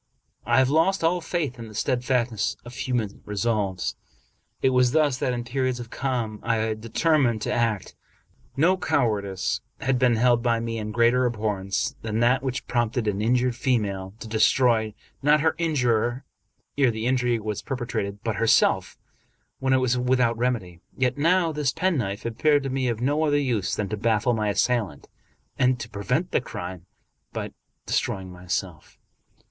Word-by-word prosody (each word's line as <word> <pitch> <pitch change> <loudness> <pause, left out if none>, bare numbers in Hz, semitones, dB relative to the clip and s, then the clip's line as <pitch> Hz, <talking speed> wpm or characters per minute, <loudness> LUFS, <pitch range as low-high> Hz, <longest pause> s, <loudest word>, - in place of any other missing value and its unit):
I 120 +1 +3
have 130 0 +4
lost 165 +4 +2
all 175 +2 +2
faith 160 -7 -3
in 115 - -7
the 110 - -12
steadfastness 120 -3 0
of 120 - -9
human 120 -5 -2
resolves. 105 -2 -1 0.7
It 130 - +4
was 125 0 +3
thus 150 -5 +2
that 125 - 0
in 120 -1 -3
periods 130 +1 -1
of 120 -1 -8
calm 120 -5 -2
I 115 -1 0
had 110 -1 -1
determined 120 -1 +1
to - - -1
act. 115 -5 -1 0.6
No 175 +6 +4
cowardice 100 - 0 0.2
had 130 -1 +1
been 125 -2 +4
held 120 +1 +3
by 115 -1 +1
me 115 0 -3
in 105 0 -4
greater 120 +3 +3
abhor 110 -3 -1
rence 100 0 -1
than 110 0 -2
that 125 +2 +3
which 130 -1 -3
prompted 120 -1 0
an 105 -1 0
injured 125 +2 +2
female 105 -6 -1
to - - -6
de 110 0 -2
stroy, 110 -2 +3 0.3
not 150 +1 +4
her 160 +1 +3
injurer 125 -6 +1 0.5
ere 135 -3 +5
the 110 0 -3
injury 125 -1 +2
was 105 -1 -4
perpetrated, 115 -6 -4
but 110 -3 -2
herself 115 - +3 0.6
when 135 0 0
it 130 - +5
was 125 -1 +1
without 125 -2 +2
remedy. 115 -8 -2 0.2
Yet 130 +1 0
now 170 +2 +3
this 150 -3 0
pen 185 -3 0
knife 100 -2 -3
appeared 145 +5 +2
to 135 - -3
me 130 -1 0
of 115 -1 -2
no 145 +5 +1
other 145 -2 +2
use 115 -9 0
than 105 - -2
to 105 - -3
baffle 115 +2 +1
my 110 -2 0
assailant 105 - 0 0.5
and 125 -2 +2
prevent 125 - -1
the - - +2
crime 90 -6 -7 0.5
by - - -4 0.3
destroying 95 -1 -2
myself. 90 -1 -5
120 Hz, 170 wpm, -25 LUFS, 110-130 Hz, 0.7 s, ere